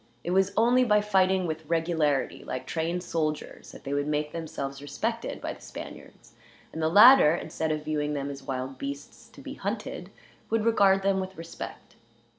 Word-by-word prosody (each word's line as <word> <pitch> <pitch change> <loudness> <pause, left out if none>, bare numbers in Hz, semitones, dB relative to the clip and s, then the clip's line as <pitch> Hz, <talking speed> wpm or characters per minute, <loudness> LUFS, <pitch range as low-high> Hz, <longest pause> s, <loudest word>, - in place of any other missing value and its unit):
It 175 - -3
was 190 +1 +3
only 245 +3 +4
by 210 -3 +4
fighting 190 -3 +2
with 160 -1 -4
regularity, 165 -4 0
like 130 - -5
trained 170 +2 -2
soldiers, 155 -3 -3
that - - -13
they 140 - -4
would 145 0 0
make 150 0 -1
themselves 150 -4 -5
respected 220 +12 -3
by - - -4
the - - -16
Spaniards; - - -11 0.4
and 160 - -4
the 160 - +2
latter, 205 - +8
instead 160 -2 -3
of 155 0 -3
viewing 150 -1 -1
them 140 0 -3
as 140 -1 -8
wild 130 0 -5
beasts 140 +1 -7
to - - -14
be - - -7
hunted, - - -5 0.4
would 225 -1 0
regard 195 -4 +4
them 195 0 +2
with 190 0 -6
respect. 165 0 -9
160 Hz, 180 wpm, -27 LUFS, 145-190 Hz, 0.4 s, latter